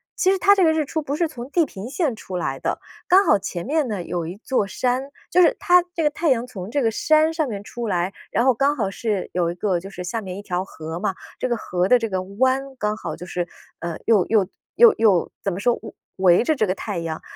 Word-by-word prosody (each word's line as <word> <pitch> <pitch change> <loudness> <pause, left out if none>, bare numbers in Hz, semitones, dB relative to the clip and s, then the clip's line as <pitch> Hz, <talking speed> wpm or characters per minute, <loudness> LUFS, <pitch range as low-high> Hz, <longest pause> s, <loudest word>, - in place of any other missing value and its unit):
其 375 - +3
实 390 - +2
它 400 +2 +6
这 385 - +3
个 320 - +5
日 315 -1 0
出 315 +3 -2
不 290 -1 -3
是 335 +2 +1
从 255 -4 -9
地 335 +2 +2
平 220 -4 -8
线 290 -3 -1
出 185 -4 -6
来 135 -6 -2
的， - - -2 0.3
刚 385 +3 +6
好 205 - +4
前 175 -3 -5
面 300 0 +1
呢 205 -5 -3
有 170 -1 -3
一 175 - -6
座 225 -2 -1
山， 255 +6 -1 0.2
就 360 - +5
是 340 - +5
它 360 -3 +5
这 330 - 0
个 300 - +4
太 320 +2 0
阳 245 -3 +2
从 195 -6 -8
这 280 +4 0
个 225 - +2
山 310 +7 +3
上 315 -2 0
面 205 -3 -5
出 235 +2 -5
来， 180 0 -1 0.2
然 235 +4 +2
后 260 - +5
刚 275 +5 +2
好 205 -8 -1
是 205 -2 -2
有 175 -2 +1
一 - - -7
个 180 -1 0
就 190 +3 -9
是 180 -2 -7
下 220 +6 -3
面 185 -2 -6
一 - - -6
条 180 -1 -2
河 160 -3 -7
嘛， 195 -1 -1 0.2
这 255 - -1
个 240 - 0
河 180 -3 -1
的 250 - +6
这 230 -2 -3
个 190 -2 -1
湾 260 +8 0
刚 210 -2 -1
好 155 - -5
就 170 +2 -9
是， 175 -1 -3 0.3
呃， 170 -2 -4
又 215 -5 +4
又 210 -4 +3 0.3
又 470 -2 +8
又 205 -6 +3
怎 195 - 0
么 180 - -4
说， 240 +4 +3
围 220 - -9 0.2
围 185 +2 +5
着 315 - +1
这 220 - +2
个 185 - 0
太 200 0 -5
阳， 165 -2 -4
220 Hz, 285 characters per minute, -22 LUFS, 185-280 Hz, 0.3 s, 又